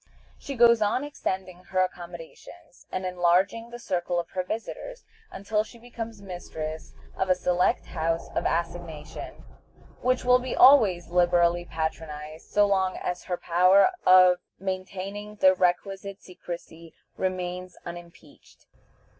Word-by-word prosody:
She 280 - -6
goes 235 -1 +6
on 215 +6 +1
extending 185 -10 -5
her 185 - -1
accommodations, 175 -1 -9
and 185 0 -3
enlarging 185 +5 +1
the 240 - -8
circle 180 -6 -2
of 170 - -6
her 185 - -1
visitors, 225 - -6 0.3
until 210 +2 -1
she 235 - -15
becomes 230 -3 -8
mistress 160 - -7 0.2
of 190 - -1
a 185 - +5
select 180 0 +1
house 165 0 -2
of - - -1
assignation, 170 -2 -5 0.6
which 255 0 +1
will 250 0 +6
be 255 0 -4
always 210 -11 +6
liberally 175 -1 +3
patronized 160 -1 -5
so 205 0 +4
long 190 -2 +1
as 180 0 -4
her 180 - -2
power 185 - +4
of 185 -1 +7 0.2
maintaining 195 +2 -5
the 190 -2 +5
requisite 190 +2 -1
secrecy 170 -2 -9 0.2
remains 180 -1 -3
unimpeached. 170 -1 -12
185 Hz, 130 wpm, -26 LUFS, 175-205 Hz, 0.6 s, of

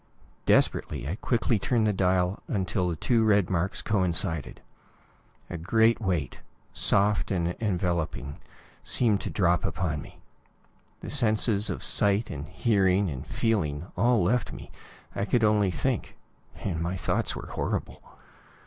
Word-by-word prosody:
Desperately, 70 -3 +2
I 80 - -2
quickly 115 0 0
turned 115 +2 +1
the 105 - +2
dial 90 0 +1
until 95 -2 -1
the 85 - -2
two 115 +8 +1
red 100 -4 +3
marks 90 +2 -1
coincided. 85 -6 -1 0.9
A 85 - -6
great 110 +7 +3
weight, 90 - -2 0.3
soft 100 +1 +2
and 85 -3 0
enveloping, 85 -8 -2 0.4
seemed 110 -5 +1
to - - -4
drop 90 -3 +1
upon 80 -6 -2
me. - - -13 0.8
The - - -5
senses 110 -5 +2
of - - -4
sight 105 +1 +2
and 75 0 -6
hearing 95 -1 +2
and 65 -2 -7
feeling 85 -8 -1
all 115 +1 +3
left 115 +5 +1
me. - - -10 0.4
I - - -1
could 115 +2 +1
only 105 -2 +3
think 75 -5 -2 0.4
and 85 -5 -4
my 90 +3 -2
thoughts 85 - -1
were - - -8
horrible. - - -3
95 Hz, 140 wpm, -27 LUFS, 85-110 Hz, 0.9 s, red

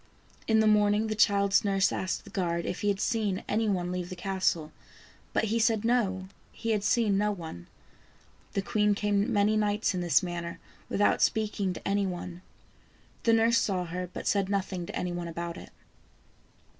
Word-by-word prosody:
In 220 -1 +4
the - - +3
morning 210 0 +4
the 215 - -1
child's 200 -1 +3
nurse 195 -1 +2
asked 185 - -2
the - - -14
guard 170 -4 -1
if - - -4
he 205 - -1
had 200 -1 +1
seen 210 -5 0
any 220 +1 +1
one 180 -2 -1
leave 180 -1 -3
the 185 - -6
castle, 180 -4 -1 0.6
but - - +1
he 225 +1 0
said 225 -1 +2
no, 195 -6 +1 0.2
he 230 - -3
had 210 -2 0
seen 210 -2 +2
no 210 0 +2
one. 160 - -8 0.9
The 195 - -1
queen 210 0 +2
came 205 +2 +1
many 210 0 +3
nights 210 0 +1
in 180 - -2
this 175 +2 +3
manner 170 -1 -5 0.3
without 205 - +2
speaking 210 -3 +1
to - - -7
any 200 0 +1
one. 180 -1 -6 0.8
The 230 - +5
nurse 230 +1 +4
saw 185 -5 -1
her, 180 +1 -5
but - - -7
said 200 -2 +1
nothing 190 -3 -2
to - - -7
any 180 - -2
one 175 -1 -4
about 170 0 -5
it. - - -10
200 Hz, 185 wpm, -29 LUFS, 180-215 Hz, 0.9 s, The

